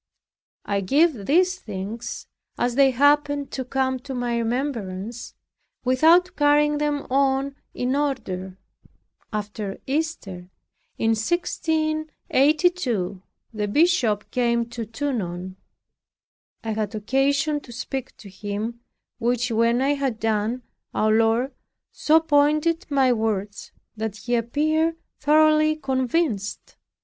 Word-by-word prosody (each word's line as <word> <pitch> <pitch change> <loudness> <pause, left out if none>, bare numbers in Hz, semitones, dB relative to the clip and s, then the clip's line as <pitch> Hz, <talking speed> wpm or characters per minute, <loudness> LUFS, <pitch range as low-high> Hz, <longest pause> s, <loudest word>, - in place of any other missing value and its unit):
I 200 -1 0
give 275 - +2
these 365 +4 +3
things, 210 +4 -6 0.3
as 245 0 0
they 275 +1 +5
happen 285 +2 +3
to 260 - -4
come 260 0 -1
to 265 +1 -7
my 245 -1 -1
remembrance, 230 -3 -3 0.5
without 325 +8 +4
carrying 295 0 +3
them 295 -1 -1
on 275 0 +1 0.2
in 250 +2 0
order. 190 -11 -2 0.7
After 210 -1 -4
Easter, 265 - -3 0.5
in 225 - +1
1682, 310 - 0 0.3
the 210 -1 -2
bishop 245 - +2
came 235 -1 +1
to 230 -2 -5
Tonon. 190 -8 -4 1.1
I 225 - -2
had 215 0 -2
occasion 275 +7 +1
to 260 - -14
speak 260 +2 -5
to 205 - -12
him, 205 +4 -5 0.4
which 245 +1 0
when 230 +3 +2
I 280 +2 +3
had 270 -6 -2
done, 225 +3 -1 0.3
our 215 0 +2
Lord 225 +4 +2 0.4
so 315 +1 +4
pointed 305 +3 +2
my 270 -3 +3
words 210 -3 -2 0.2
that 220 -2 -3
he 240 +3 -4
appeared 310 +8 +1 0.2
thoroughly 310 +1 +4
convinced. 260 - -1
255 Hz, 110 wpm, -24 LUFS, 220-295 Hz, 1.1 s, they